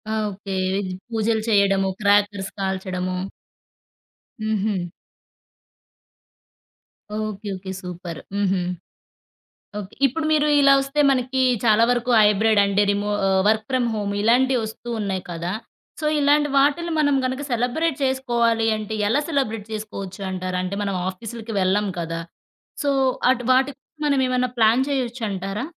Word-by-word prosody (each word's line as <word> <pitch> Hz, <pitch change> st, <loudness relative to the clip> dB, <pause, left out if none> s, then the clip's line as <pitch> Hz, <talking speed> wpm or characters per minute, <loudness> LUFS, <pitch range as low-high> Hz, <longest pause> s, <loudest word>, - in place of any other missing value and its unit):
Okay. 205 Hz, -2 st, -4 dB, 0.2 s
Veg 195 Hz, -2 st, -2 dB, 0.2 s
పూజలు 220 Hz, 0 st, 0 dB
చేయడము, 195 Hz, -2 st, +3 dB
crackers 205 Hz, -1 st, +2 dB
కాల్చడము. 185 Hz, -1 st, -2 dB, 1.2 s
హుహు. 210 Hz, -4 st, -1 dB, 2.3 s
ఓకే. 215 Hz, -1 st, -4 dB
ఓకే. 190 Hz, 0 st, -7 dB
సూపర్. 180 Hz, -2 st, -7 dB, 0.2 s
హుహు. 195 Hz, -2 st, +1 dB, 1.2 s
ఓకే. 200 Hz, -1 st, -8 dB
ఇప్పుడు 305 Hz, +5 st, -3 dB
మీరు 300 Hz, -1 st, +3 dB
ఇలా 275 Hz, 0 st, +6 dB
వస్తే 275 Hz, +2 st, -1 dB
మనకి 260 Hz, 0 st, 0 dB, 0.2 s
చాలా 220 Hz, 0 st, +5 dB
వరకు 245 Hz, 0 st, 0 dB
హైబ్రిడ్ 210 Hz, 0 st, +4 dB
అంటే, 200 Hz, +1 st, +2 dB
రిమో 205 Hz, +1 st, -1 dB, 0.4 s
వర్క్ 220 Hz, 0 st, +2 dB
ఫ్రామ్ 255 Hz, -2 st, +1 dB
హోమ్ 205 Hz, -1 st, -2 dB
ఇలాంటివస్తూ 240 Hz, -1 st, +1 dB
ఉన్నాయి 190 Hz, -3 st, -2 dB
కదా! 170 Hz, +1 st, -3 dB, 0.5 s
సో, -, -, -5 dB
ఇలాంటి 295 Hz, +1 st, +3 dB
వాటిలిని 295 Hz, +5 st, +2 dB
మనం 285 Hz, -2 st, +3 dB
గనక 260 Hz, +2 st, -2 dB
సెలబ్రేట్ 250 Hz, +6 st, 0 dB
చేసుకోవాలి 235 Hz, -4 st, +1 dB
అంటే, 215 Hz, 0 st, -5 dB
ఎలా 270 Hz, +7 st, +2 dB
సెలబ్రేట్ 225 Hz, -8 st, -1 dB
చేసుకోచ్చు 210 Hz, -2 st, -6 dB
అంటారు. 185 Hz, 0 st, -3 dB
అంటే 185 Hz, +2 st, -3 dB
మనం 200 Hz, -1 st, -2 dB
ఆఫీసులకి 225 Hz, +4 st, -7 dB
వెళ్ళం 195 Hz, +3 st, +2 dB
కదా! 165 Hz, 0 st, -4 dB, 0.6 s
సో, 285 Hz, -, +1 dB, 0.4 s
అటు 250 Hz, -1 st, 0 dB
వాటికి 265 Hz, +1 st, +1 dB, 0.3 s
మనమేమన్నా 255 Hz, -3 st, +1 dB
ప్లాన్ 225 Hz, +3 st, +4 dB
చేయొచ్చంటారా? 225 Hz, -6 st, -2 dB
215 Hz, 120 wpm, -22 LUFS, 195-255 Hz, 2.3 s, ఇలా